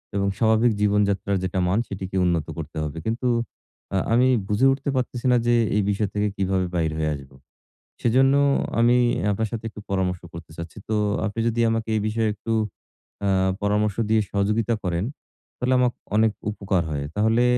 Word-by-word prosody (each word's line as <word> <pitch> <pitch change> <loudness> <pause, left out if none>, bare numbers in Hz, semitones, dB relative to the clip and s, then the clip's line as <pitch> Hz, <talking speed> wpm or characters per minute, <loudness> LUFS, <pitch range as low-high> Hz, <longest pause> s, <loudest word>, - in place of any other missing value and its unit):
এবং 100 0 +1
স্বাভাবিক 110 +1 +4
জীবনযাত্রার 100 -1 +2
যেটা 95 0 -1
মান 95 +4 +2
সেটিকে 95 -1 -5
উন্নত 85 -4 +1
করতে 80 -1 -6
হবে। 75 +1 -5
কিন্তু 115 +3 -1 0.7
আ - - +3 0.2
আমি 125 +2 +5 0.2
বুঝে 105 +6 +2
উঠতে 135 +1 -2
পারতেছি 125 -1 -2
না 125 - +5
যে 120 - +4 0.2
এই 105 - +2
বিষয় 100 0 0
থেকে 105 0 +1
কিভাবে 95 -1 +1
বাহির 80 -2 +1
হয়ে 80 -1 0
আসব? 70 -1 -11 0.7
সেজন্য 130 +3 +4 0.5
আমি 120 +1 +5 0.3
আপনার 110 +2 0
সাথে 115 -1 -4
একটু 105 - -10
পরামর্শ 90 -2 0
করতে 85 -1 -9
চাচ্ছি। 85 +4 -8
তো 110 - +1 0.3
আপনি 105 +2 -3
যদি 115 0 -1
আমাকে 115 0 -1
এই - - +1
বিষয়ে 110 0 0
একটু 110 +2 -4 0.7
আ - - +2 0.3
পরামর্শ 105 0 +1
দিয়ে 110 - +4
সহযোগিতা 105 +3 +1
করেন 90 0 0 0.5
তাহলে 125 +1 +1
আমাকে 125 -1 +3 0.2
অনেক 110 0 +4 0.2
উপকার 100 -3 -1
হয়। 70 -2 -2
তাহলে 110 +3 +3
105 Hz, 170 wpm, -24 LUFS, 95-115 Hz, 0.7 s, আমি